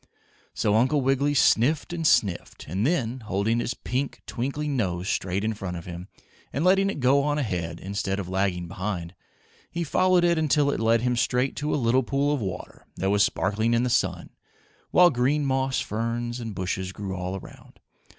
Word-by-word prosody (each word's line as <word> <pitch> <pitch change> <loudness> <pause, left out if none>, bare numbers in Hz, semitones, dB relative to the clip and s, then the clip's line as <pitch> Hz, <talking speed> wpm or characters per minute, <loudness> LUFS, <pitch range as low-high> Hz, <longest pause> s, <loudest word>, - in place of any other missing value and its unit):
So 105 - +1
Uncle 130 +6 +3
Wiggily 135 +2 +1
sniffed 145 +6 +3
and 165 -2 0
sniffed, 95 -10 +1
and 95 - 0
then, 130 -7 0
holding 110 +1 0
his 120 +1 -2
pink, 130 +2 -3
twinkling 140 +4 -3
nose 90 -6 -1
straight 95 0 -1
in 110 +1 0
front 95 -4 -5
of 85 - -9
him 90 +1 -7 0.4
and 145 +6 -1
letting 195 +1 +4
it 195 - -4
go 135 +2 +4
on 145 +1 0
ahead, 90 - -3
instead 100 0 -3
of 100 -3 -4
lagging 95 -2 -1
behind, 90 -2 -4 0.6
he 170 - -3
followed 185 +3 +3
it 170 -1 +3
until 150 -2 +2
it - - -2
led 115 0 +3
him 125 0 +1
straight 125 +2 +1
to 150 +1 -2
a - - +2
little 130 -1 +2
pool 140 +3 0
of 145 - -2
water 95 -3 -6
that 95 +1 0
was 100 0 +4
sparkling 110 +5 +1
in 115 - +2
the 125 - 0
sun, - - 0 0.6
while 180 -1 +6
green 140 +4 +1
moss 135 -1 0
ferns 120 +2 -3
and 115 -4 -6
bushes 95 0 -3
grew 95 -1 -5
all 90 +1 -4
around. 95 - -12
120 Hz, 190 wpm, -25 LUFS, 95-140 Hz, 0.6 s, while